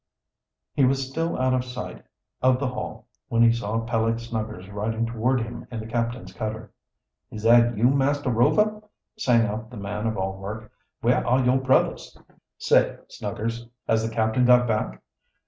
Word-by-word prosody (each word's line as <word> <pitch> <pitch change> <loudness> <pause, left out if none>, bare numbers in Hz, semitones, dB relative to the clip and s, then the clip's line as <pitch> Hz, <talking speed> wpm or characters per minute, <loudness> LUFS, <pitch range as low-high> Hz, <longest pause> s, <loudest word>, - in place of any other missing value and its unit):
He 140 - +2
was 135 +1 +2
still 165 +5 -2
out 130 0 +2
of 130 -1 +1
sight 125 0 -7 0.4
of 130 0 +4
the 135 -2 -1
Hall 125 - -6 0.2
when 115 0 +3
he 115 - +6
saw 115 -1 -1
Peleg 115 0 0
Snuggers 110 -5 -5
riding 110 +3 -2
toward 120 +2 0
him 120 +1 -7
in 115 - -5
the 110 - -6
captain's 115 +2 -3
cutter. 110 0 -5 0.6
"Is 105 - -8
that 120 0 +5
you, 110 - -2
Master 140 0 +1
Rover!" 210 - +2 0.4
sang 120 - +4
out 110 +2 -4
the 125 - -10
man 105 +2 -3
of 110 - -2
all 95 0 -3
work. 105 +2 -7 0.3
"Where - - +2
are 125 +1 +2
your 130 +1 +4
brothers?" 130 0 +1 0.4
"Safe, - - +3
Snuggers. 115 +2 -4 0.2
Has 110 - +2
the 115 - -2
captain 110 +2 +1
got 125 0 +5
back?" 105 - -2
115 Hz, 170 wpm, -25 LUFS, 110-125 Hz, 0.6 s, he